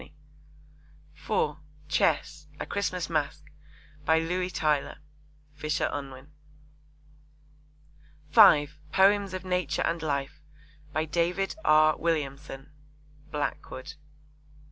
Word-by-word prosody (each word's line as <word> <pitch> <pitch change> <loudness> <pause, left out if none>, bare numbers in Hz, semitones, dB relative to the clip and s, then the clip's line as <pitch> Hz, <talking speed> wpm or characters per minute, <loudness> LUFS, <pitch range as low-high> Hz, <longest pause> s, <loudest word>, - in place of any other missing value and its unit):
(4) 150 0 -1 0.3
Chess. 150 -1 0
A - - -3
Christmas 185 -3 -2
Masque. 155 -1 -3 0.5
By 160 +2 +3
Louis 180 +3 -1
Tylor. 150 -5 0 0.6
(Fisher 150 0 -1
Unwin.) 135 0 -7 2.0
(5) 145 +1 +6
Poems 195 0 +3
of 185 0 -6
Nature 180 -5 0
and 165 -1 -1
Life. 140 -2 -3 0.5
By 155 +1 -1
David 175 +5 -1
R. 155 0 +5
Williamson. 140 -4 -3 0.6
(Blackwood.) 145 -1 -4
155 Hz, 85 wpm, -28 LUFS, 145-170 Hz, 2.0 s, 5